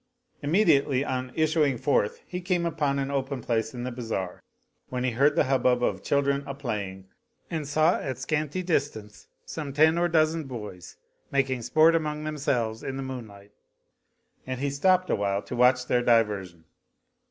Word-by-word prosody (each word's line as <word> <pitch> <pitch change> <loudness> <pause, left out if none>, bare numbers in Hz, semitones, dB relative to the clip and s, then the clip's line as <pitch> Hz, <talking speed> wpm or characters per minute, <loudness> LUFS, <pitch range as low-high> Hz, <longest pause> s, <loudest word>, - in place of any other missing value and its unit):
Immediately 145 -5 +3
on 130 -2 -3
issuing 155 -4 +2
forth 115 -6 0
he 180 0 -5
came 175 -1 0
upon 150 -4 0
an 135 0 -2
open 135 -1 -2
place 115 -2 -1
in 120 -1 -6
the 125 - -3
Bazar 115 -7 -4 0.5
when 125 -1 -3
he 130 - +1
heard 140 +5 +3
the - - +4
hubbub 130 -2 +2
of - - 0
children 140 0 +1
a 140 - -5
playing 100 -8 -4 0.5
and 155 -4 -3
saw 155 +4 +3
9X 130 -2 -4
scanty 155 +3 -2
distance 135 - -2 0.2
some 150 -3 -5
ten 160 +3 +4
or 175 - +3
dozen 160 -1 +2
boys 105 -9 -8 0.3
making 135 -2 0
sport 155 +7 +4
among 150 -2 -1
themselves 125 -7 -1
in 135 0 -4
the 135 - -4
moonlight; 110 -6 -8 1.0
and 130 -1 -3
he 140 +1 -1
stopped 185 +6 +2
awhile 100 0 0
to - - -6
watch 125 +1 +4
their 125 0 +2
diversion. 105 -8 +1
135 Hz, 165 wpm, -27 LUFS, 120-155 Hz, 1.0 s, the